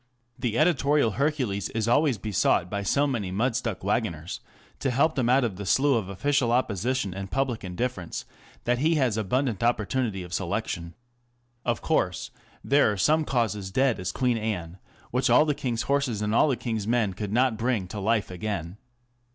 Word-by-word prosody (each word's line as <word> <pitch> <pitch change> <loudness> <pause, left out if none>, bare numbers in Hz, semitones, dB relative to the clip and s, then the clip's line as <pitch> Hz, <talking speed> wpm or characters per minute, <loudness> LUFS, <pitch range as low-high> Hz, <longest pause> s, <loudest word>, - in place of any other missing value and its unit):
The 115 -2 -1
editorial 145 -5 +3
Hercules 130 -8 -1
is 110 -1 0
always 135 0 +3
besought 95 -4 +1
by 100 -1 -1
so 140 +9 +2
many 115 -9 -2
mud 115 +6 0
stuck 115 -7 -3
waggoners 95 -6 -2 0.4
to - - 0
help 140 +6 +2
them 125 -3 0
out 130 +1 +4
of 105 -6 -2
the 100 - -5
slough 135 +4 +3
of - - -10
official 135 +4 +1
opposition 120 -2 0
and 95 0 -6
public 130 -3 -1
indifference, 95 0 -4 0.4
that 120 0 +1
he 160 +4 +3
has 130 -7 +2
abundant 115 +1 0
opportunity 115 -3 0
of 90 0 -9
selection. 85 -1 -3 0.7
Of 120 -2 -1
course, - - 0 0.3
there 140 -5 +4
are 105 - -3
some 155 +8 +3
causes 110 -7 -1
dead 130 +2 +1
as 90 0 -2
Queen 125 +1 0
Anne, 95 -5 -4 0.3
which 125 +1 +1
all 125 +6 +6
the 150 - +1
king's 125 -5 -2
horses 140 -7 0
and 105 +1 0
all 120 - +5
the 135 -4 +1
king's 110 -4 -3
men 115 -4 +1
could 105 +1 -5
not 125 +1 +2
bring 115 -4 -1
to 105 - -5
life 105 0 0
again. 90 -1 -4
115 Hz, 180 wpm, -26 LUFS, 100-130 Hz, 0.7 s, all